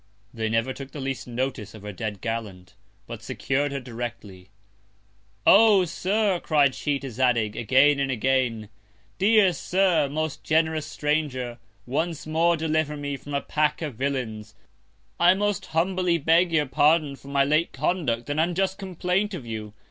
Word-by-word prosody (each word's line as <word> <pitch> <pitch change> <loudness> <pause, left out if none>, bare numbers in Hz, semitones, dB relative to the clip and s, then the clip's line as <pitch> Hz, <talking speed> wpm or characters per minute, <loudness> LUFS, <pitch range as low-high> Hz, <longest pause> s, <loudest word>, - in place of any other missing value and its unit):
They 110 -1 -2
never 115 +4 0
took 135 0 -9
the 150 - -6
least 135 -2 -4
Notice 120 -3 -4
of 105 - -12
her 105 - -6
dead 105 -1 -5
Gallant, 105 -6 -5 0.3
but - - -8
secur'd 140 +1 -1
her 140 - -3
directly. 115 -7 -8 1.0
Oh! 205 -2 +6
Sir, 190 +3 0
cried 145 -5 +2
she 145 +1 -1
to 135 -1 -7
Zadig, 120 -3 +1
again 135 +5 +4
and 135 -1 0
again, 125 -3 0 0.5
dear 200 -2 +4
Sir, 175 -2 +1
most 155 +1 -3
generous 160 -1 +1
Stranger, 140 -5 -2 0.3
once 160 +5 -2
more 165 +2 +2
deliver 155 -1 -1
me 145 -1 -4
from 145 +1 -7
a 140 - 0
Pack 150 +1 0
of 150 -4 -4
Villains. 110 -5 -4 0.6
I 175 +2 +6
most 205 -1 -1
humbly 180 +1 +1
beg 165 +3 +3
your 155 -2 +2
Pardon 150 +1 +2
for 135 - -17
my 140 0 +2
late 155 +4 +1
Conduct 125 -10 -1
and 145 +1 -2
unjust 185 +4 0
Complaint 190 +2 -1
of 140 -9 -8
you. 110 -2 -6
145 Hz, 155 wpm, -25 LUFS, 120-165 Hz, 1.0 s, Oh